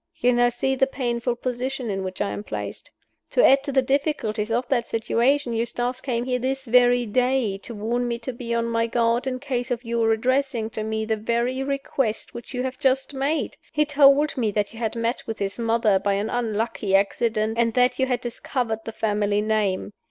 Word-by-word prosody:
You 245 +1 +2
now 240 0 +4
see 255 +2 0
the 265 0 +2
painful 240 -2 -1
position 250 -1 -3
in 195 -1 -2
which 185 0 -5
I 205 - 0
am 205 - -5
placed. - - -6 0.4
To - - +4
add 275 +1 +6
to 280 - -2
the 265 -1 +3
difficulties 255 -6 0
of 240 +2 0
that 240 -3 +1
situation, 240 +3 +1
Eustace 240 +2 -2
came 240 -3 -2
here 250 -1 0
this 265 +2 -2
very 245 0 +4
day 245 -2 +1
to 230 +3 -8
warn 235 +4 -1
me 235 0 -1
to 245 +2 -6
be 235 -1 -6
on 230 0 +1
my 230 0 0
guard, 235 +2 +1
in 255 -1 -1
case 255 -2 -3
of 245 -1 -2
your 230 -1 +1
addressing 250 0 0
to 215 - -3
me 220 0 -2
the 220 0 0
very 235 +4 -1
request 270 -4 -2
which 235 - -9
you 250 -1 -2
have 260 0 -4
just 270 0 +1
made! 280 +4 -1
He 300 -1 +2
told 285 0 +5
me 230 -4 0
that 205 +1 -1
you 225 - -10
had 225 -1 -2
met 230 +2 -2
with 225 - -4
his 200 +3 -2
mother, 225 -3 +2
by 200 +1 0
an 205 +3 -1
unlucky 220 -4 -1
accident, 215 +2 +1
and 230 -1 +2
that 250 0 +3
you 265 - +2
had 250 -2 0
discovered 240 -1 -2
the 225 - -4
family 210 -2 0
name. 210 -2 0
240 Hz, 210 wpm, -24 LUFS, 220-260 Hz, 0.4 s, add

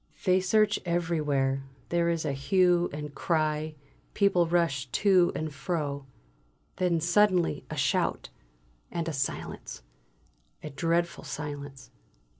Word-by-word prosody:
They 185 0 +4
search 205 +3 +2
everywhere; 150 -6 0 0.3
there 170 0 +2
is 165 -1 -1
a 140 - 0
hue 175 +4 +3
and 150 0 -6
cry; 155 -1 0 0.4
people 190 -4 +3
rush 165 -6 +1
to 185 - +4
and 155 -1 -3
fro. 140 -2 -3 0.7
Then 180 -2 +2
suddenly 180 +1 +2
a - - -5
shout; - - 0 0.6
and 170 -1 -3
a 165 - -2
silence, 135 - -4 0.8
a 150 - -6
dreadful 170 +4 0
silence. 145 -3 -7
165 Hz, 115 wpm, -28 LUFS, 145-175 Hz, 0.8 s, They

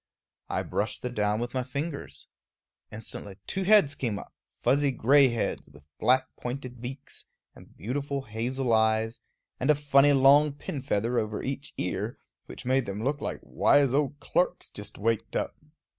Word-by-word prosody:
I - - -1
brushed - - -2
the 125 - -2
down 105 -2 0
with 120 +1 -4
my 130 - 0
fingers. 140 - -5 0.7
Instantly 105 -2 -6
two 190 - -2
heads 200 -8 +5
came 115 -7 -2
up, - - -10 0.3
fuzzy 140 +1 +3
gray 135 +2 +5
heads, 120 -2 -2
with 70 0 -18
black 130 +1 +4
pointed 125 -1 -6
beaks, 130 +3 -8 0.3
and - - -17
beautiful 140 - -3
hazel 120 +3 -1
eyes, 110 +1 +2 0.4
and 130 - 0
a 150 - +7
funny 145 0 +4
long 140 +2 +6
pin 140 -1 -6
feather 120 -1 0
over 105 -1 -3
each 135 +1 -5
ear, - - -3 0.3
which - - -10
made 130 0 +2
them 100 +2 -4
look 140 +3 -1
like - - -4
little - - -20
wise 140 -3 +5
old 145 0 0
clerks 180 +1 -1
just 105 0 -8
waked 115 +1 -1
up. - - -1
130 Hz, 165 wpm, -28 LUFS, 110-140 Hz, 0.7 s, a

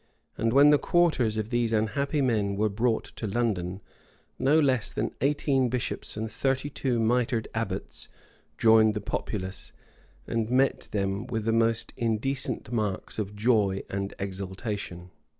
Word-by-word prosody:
And 115 +1 0
when 140 +4 +7
the 145 - +5
quarters 155 - +2
of 110 +2 -3
these 120 -1 +1
unhappy 140 +7 0
men 105 -6 +1
were 105 +2 +1
brought 110 +3 0
to 110 - -3
London, 95 -4 -1 0.6
no 145 +4 +4
less 130 -6 +2
than - - -3
eighteen 135 -2 +2
bishops 125 -3 -3
and 110 +1 -2
thirty 135 +4 -1
two 125 -3 -1
mitred 115 0 +1
abbots 115 -2 -4 0.5
joined 110 -1 +5
the - - -1
populace, 100 -2 -4 0.5
and 115 -1 -1
met 130 +2 +2
them 100 +2 -2
with 110 -3 -3
the 115 - +2
most 115 0 +1
indecent 115 +2 -1
marks 105 -3 -2
of 105 -1 -4
joy 105 -3 +2
and 100 0 -3
exultation. 95 -1 -5
115 Hz, 145 wpm, -27 LUFS, 105-125 Hz, 0.6 s, when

